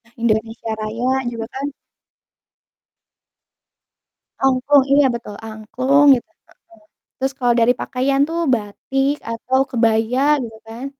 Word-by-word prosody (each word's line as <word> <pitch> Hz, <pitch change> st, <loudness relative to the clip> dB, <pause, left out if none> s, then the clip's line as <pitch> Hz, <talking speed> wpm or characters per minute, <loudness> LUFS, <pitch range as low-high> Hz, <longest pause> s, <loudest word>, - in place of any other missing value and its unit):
Indonesia 225 Hz, 0 st, -1 dB
Raya 245 Hz, +5 st, -1 dB
juga, 230 Hz, -1 st, -5 dB
kan. 275 Hz, +2 st, -3 dB, 2.8 s
Angklung, 270 Hz, +1 st, +4 dB
iya, 285 Hz, 0 st, +5 dB
betul, 230 Hz, -3 st, -7 dB
angklung 255 Hz, +6 st, +1 dB
gitu, 240 Hz, -, -6 dB
heeh. -, -, -48 dB, 0.7 s
Terus 265 Hz, +1 st, -2 dB
kalau 245 Hz, -2 st, +3 dB
dari 235 Hz, +2 st, +4 dB
pakaian 275 Hz, +2 st, 0 dB
tuh 330 Hz, +1 st, -4 dB, 0.2 s
batik 270 Hz, +6 st, -1 dB, 0.2 s
atau 255 Hz, +3 st, -1 dB
kebaya 230 Hz, 0 st, +1 dB, 0.2 s
gitu, 225 Hz, -2 st, -8 dB
kan. 230 Hz, +4 st, -8 dB
245 Hz, 110 wpm, -19 LUFS, 225-270 Hz, 2.8 s, iya